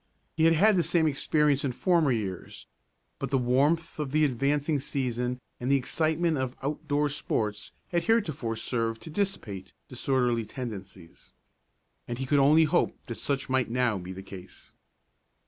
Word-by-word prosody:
He 160 - +3
had 165 0 +5
had 210 +6 +5
the - - +4
same 170 -1 +2
experience 150 -1 +2
in 135 -3 -1
former 165 0 +2
years; 100 -6 -4 0.5
but - - -3
the 135 - +2
warmth 140 +7 +1
of 145 -3 -2
the 155 +1 +4
advancing 145 +3 +1
season 125 -3 -2 0.2
and 125 +2 -1
the - - +6
excitement 160 +3 +1
of 130 0 -2
out 150 +3 -3
door 145 0 +2
sports 105 -7 -2 0.2
had 170 -2 0
heretofore 155 - +1
served 115 0 -2
to 160 - -8
dissipate 150 - -3
disorderly 125 -2 0
tendencies, 100 -7 -8 0.7
and 120 - -4
he 135 - -3
could 145 +2 +3
only 150 +4 +6
hope 160 +3 +1
that 115 - -6
such 140 -1 -1
might 130 -2 +1
now 120 -4 +1
be 90 +1 -7
the 95 +1 -8
case. 95 -2 -11
135 Hz, 165 wpm, -28 LUFS, 120-155 Hz, 0.7 s, the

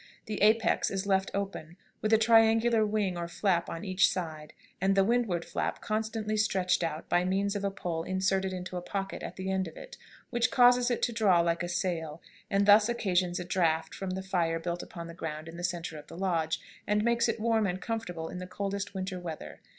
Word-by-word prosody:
The 215 - -4
apex 220 +2 +3
is 195 0 -3
left 190 -1 +2
open, 195 -4 -4 0.2
with 215 - 0
a 220 - +7
triangular 225 0 +5
wing 205 -4 0
or 170 - -3
flap 170 -1 0
on 165 +5 -5
each 185 0 +3
side, 155 -4 -5 0.3
and 195 +1 +3
the 195 - +5
windward 210 -6 +1
flap - - -2
constantly 215 0 -2
stretched 190 -4 +1
out 160 -1 -3
by 175 0 +2
means 195 +2 0
of 200 - -3
a 200 - +1
pole 175 -4 -3
inserted 190 +2 0
into 180 0 -5
a - - -3
pocket 195 +1 -4
in - - -5
the 190 0 -3
end 190 -1 0
of 165 - -11
it, - - -10 0.3
which 240 -1 +2
causes 245 0 +5
it 240 - -1
to 240 - +1
draw 200 -7 +4
like 170 0 0
a 175 - -3
sail, 170 -3 -2 0.3
and 200 0 +2
thus 210 +2 +7
occasions 185 -6 0
a 180 - -4
draught 165 -3 +1
from 195 - -5
the 190 +1 -3
fire 175 -4 0
built 170 +1 -3
upon 170 -2 -8
the 170 - -8
ground 155 -1 -6
in 165 - -9
the 175 - -6
centre 170 -3 -3
of 145 - -14
the 165 - -10
lodge, 170 -4 0 0.3
and 210 0 +2
makes 235 0 +2
it 230 - -1
warm 220 -1 +2
and 180 0 -2
comfortable 185 -9 -4
in 180 - -6
the 180 - -6
coldest 200 +1 -4
winter 185 -1 -3
weather. 165 -3 -7
190 Hz, 220 wpm, -30 LUFS, 175-210 Hz, 0.3 s, a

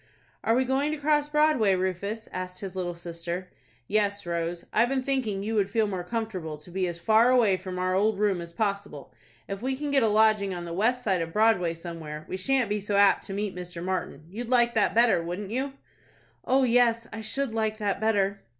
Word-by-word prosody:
"Are 225 - +3
we 260 +1 +2
going 270 +3 +1
to - - -3
cross 295 0 +1
Broadway, 300 -10 +3
Rufus?" 190 +4 -3
asked 185 0 -5
his 195 -2 -6
little 175 -2 -3
sister. 170 +1 -5 0.4
"Yes, 205 -1 0
Rose. 170 0 -3
I've 235 +2 +3
been 265 -1 0
thinking 245 -8 -1
you 220 +2 -2
would 200 -3 +1
feel 220 +1 +2
more 190 -4 -3
comfortable 185 -7 -4
to 150 +4 -15
be 185 0 -1
as 170 -1 -4
far 220 +7 +4
away 235 -6 +4
from 185 0 -6
our 185 0 0
old 205 +2 +2
room 200 -4 +1
as 170 0 -8
possible. 200 -6 -3 0.3
If 195 0 -5
we 260 +2 -1
can 290 +1 -4
get 275 -1 +4
a 225 - +3
lodging 210 -2 +3
on 175 -1 -5
the 170 - -6
west 240 +7 +1
side 190 -6 +1
of 165 0 -4
Broadway 205 -6 +3
somewhere, 160 -3 -7
we - - -4
shan't 250 +6 +1
be 210 +1 -1
so 205 0 -2
apt 200 0 +4
to 195 - -5
meet 200 -1 -3
Mr. 175 -1 -7
Martin. 185 -3 -3
You'd 225 +7 -6
like 240 -2 +3
that 210 -2 +2
better, 230 -6 +5
wouldn't 180 +4 -5
you?" 265 +3 -2 0.7
"Oh, 265 +1 +3
yes, 235 -2 +3
I 220 - -5
should 250 +3 -2
like 220 -1 -1
that 205 -2 -2
better." 200 -2 +1
205 Hz, 215 wpm, -27 LUFS, 180-230 Hz, 0.7 s, better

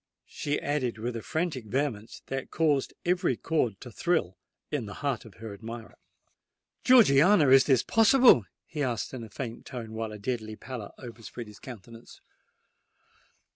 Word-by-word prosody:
she 145 0 -3
added 135 -5 -1
with 120 +2 -4
a 115 - -4
frantic 155 -6 -2
vehemence 115 -2 -3
that 135 0 -4
caused 150 -4 +1
every 175 -8 +1
chord 125 -11 -1
to 125 - -10
thrill 160 - 0 0.4
in 140 -8 -2
the 100 - -8
heart 135 -5 -1
of 110 - -14
her 110 -1 -8
admirer. 115 +2 -8 0.9
"Georgiana, 180 - +6
is 135 0 +7
this 130 -5 +3
possible?" 225 - +6 0.2
he 150 - -5
asked, 125 -3 -2
in 125 -3 -6
a 110 - -10
faint 115 +2 -6
tone, 115 -3 -7
while 110 -1 -4
a 105 - -7
deadly 110 0 -4
pallor 120 -3 -7
overspread 120 -1 -9
his 105 -1 -14
countenance. 115 -1 -12
125 Hz, 155 wpm, -28 LUFS, 110-145 Hz, 0.9 s, is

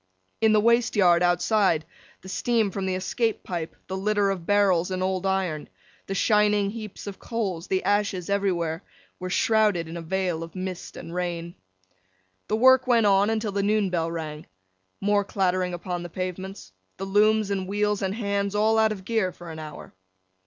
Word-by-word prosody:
In 220 -1 +5
the 215 - +5
waste 235 +2 +3
yard 175 -4 +5
outside, 175 -1 +2 0.4
the - - -10
steam 220 +1 +1
from 190 0 -3
the 185 - 0
escape 225 +4 -1
pipe, 170 -3 -5
the 190 - -5
litter 200 +1 +1
of 180 -4 -5
barrels 195 -4 +3
and 185 0 -2
old 190 0 -1
iron, 185 -6 -1 0.4
the 195 - -3
shining 210 -1 +3
heaps 215 -2 -8
of 200 -2 -7
coals, 195 -8 -3
the 190 -1 0
ashes 205 -3 0
everywhere, 175 -5 0 0.4
were 185 0 -4
shrouded 210 -4 +2
in 165 +1 -6
a - - -5
veil 180 -1 -1
of 165 +2 -8
mist 185 -1 -6
and 165 - -8
rain. 175 -1 -3 0.9
The - - +1
work 260 +2 +5
went 235 -3 +4
on, 200 +1 +4
until 220 -1 -1
the 200 0 0
noon 205 -1 +1
bell 165 -2 0
rang. 155 -2 -6 0.5
More 205 0 +2
clattering 185 -2 0
upon 175 0 -4
the 175 - -7
pavements. 185 - -6 0.3
The 195 - -4
looms, 210 +1 +3
and 190 -2 -2
wheels, 210 +1 0
and 195 0 -1
Hands 200 -2 -1
all 220 +1 +3
out 220 0 +4
of 190 -3 -6
gear 220 -4 0
for 175 -2 -10
an 160 - -8
hour. 155 -1 -9
195 Hz, 180 wpm, -25 LUFS, 180-210 Hz, 0.9 s, In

